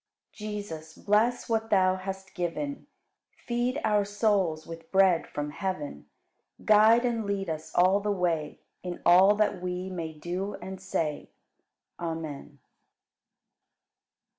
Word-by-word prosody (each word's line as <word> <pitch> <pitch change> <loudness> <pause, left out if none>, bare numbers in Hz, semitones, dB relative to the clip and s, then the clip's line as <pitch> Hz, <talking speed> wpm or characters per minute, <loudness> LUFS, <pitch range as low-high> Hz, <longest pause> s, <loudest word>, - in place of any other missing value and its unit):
44. 215 0 -6
Jesus, 160 -7 -6
bless 220 +4 +1
what 225 -1 0
Thou 185 -3 +4
hast 190 0 -7
given, 195 - -3 0.6
Feed 240 +2 0
our 210 -2 +3
souls 200 -6 0
with 165 0 -10
bread 190 -3 +4
from 145 0 -4
heaven; 150 - -4 0.6
Guide 220 +3 +6
and 235 -2 0
lead 200 -3 -2
us 155 0 -6
all 185 +3 +5
the 210 +1 -2
way 170 -5 -1 0.2
In 180 -1 -5
all 190 +4 +7
that 210 -4 +1
we 180 +1 -3
may 165 -3 -4
do 180 +6 -4
and 190 0 -8
say. 165 -6 -2 0.7
Amen. 160 -4 -5
190 Hz, 125 wpm, -28 LUFS, 165-210 Hz, 0.7 s, all